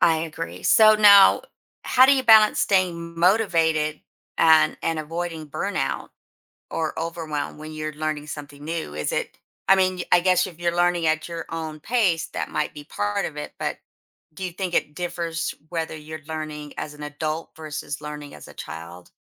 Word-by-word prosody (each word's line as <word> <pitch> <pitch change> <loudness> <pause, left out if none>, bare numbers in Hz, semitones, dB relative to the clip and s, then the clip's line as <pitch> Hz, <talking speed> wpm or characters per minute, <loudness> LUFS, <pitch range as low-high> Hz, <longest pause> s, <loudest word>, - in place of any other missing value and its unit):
I 160 -1 +4
agree. 165 0 -6
So 215 -1 +6
now, 205 -2 +7 0.4
how 255 +1 +6
do 280 - +6
you 260 - +1
balance 220 -3 +6
staying 170 -3 0
motivated 165 -6 +2 0.4
and 160 -1 +5
and 165 -1 -1
avoiding 165 0 -4
burnout - - -2 0.6
or 160 -1 -3
overwhelm 160 -3 -4
when 155 0 -8
you're 155 0 -4
learning 155 -1 -3
something 145 -1 -9
new? 160 - -4
Is 75 0 -2
it - - -3 0.3
I 195 - +7
mean, 185 -1 +2
y - - -3
I 175 - +7
guess 180 0 +3
if 170 -3 -11
you're 170 0 0
learning 175 -1 +2
at 155 +1 0
your 170 -1 -6
own 160 -2 -5
pace, 185 -8 +1
that - - -4
might 150 - -2
be 145 - -9
part 105 -6 -2
of 150 - -5
it, 150 - -6
but - - -3 0.6
do 190 - -6
you 180 - -4
think 180 -1 -4
it 150 - 0
differs 170 -1 -3 0.2
whether 165 -2 -3
you're 155 0 -9
learning 155 -2 -6
as 150 - -5
an 150 - -11
adult 155 +2 -4
versus 150 -2 -6
learning 150 -1 -8
as - - -12
a - - -13
child, 85 +2 -9
160 Hz, 180 wpm, -24 LUFS, 150-175 Hz, 0.6 s, now